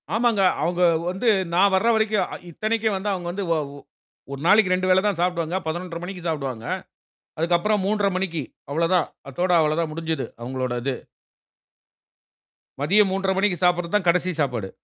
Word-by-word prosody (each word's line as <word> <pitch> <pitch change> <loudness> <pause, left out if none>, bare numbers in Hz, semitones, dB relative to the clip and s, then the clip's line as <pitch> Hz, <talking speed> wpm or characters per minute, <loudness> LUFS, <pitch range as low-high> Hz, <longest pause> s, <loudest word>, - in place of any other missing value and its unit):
ஆமாங்க. 230 -3 +2 0.2
அவங்க 175 +1 0 0.3
வந்து 190 +6 -2 0.3
நான் 195 +2 +4
வர்ற 220 +5 +2
வரைக்கும் 220 -1 +1 0.2
இத்தனைக்கும் 220 +3 0
வந்து 205 +2 -2
அவங்க 175 -2 -4
வந்து 200 +3 -4
வ - - +5 0.2
ஒ - - -10 0.5
ஒரு 140 - -5
நாளைக்கு 200 0 +5
2 185 0 0
வேளை 185 +1 +5
தான் 205 -4 +1
சாப்பிடுவாங்க. 175 -1 0
11:30 170 +1 -4
மணிக்கு 180 -1 -7
சாப்பிடுவாங்க. 135 -7 -3 0.7
அதுக்கு 170 +2 +2
அப்புறம் 210 +2 +1
3:30 205 -1 +1
மணிக்கு 175 -5 -2 0.3
அவ்வளவுதான். 165 +3 +2 0.2
அதோட 175 +7 -1
அவ்வளோ 155 0 +1
தான் 160 -2 -2
முடிஞ்சது, 160 -2 -3 0.2
அவங்களோட 130 0 -3
இது. 135 0 -1 1.9
மதியம் 200 +7 +4
3:30 190 0 0
மணிக்கு 190 -2 +2
சாப்பிடுறது 175 0 +1
தான் 200 -4 +1
கடைசி 180 +1 +3
சாப்பாடு. 120 -9 -2
180 Hz, 160 wpm, -23 LUFS, 160-195 Hz, 1.9 s, வ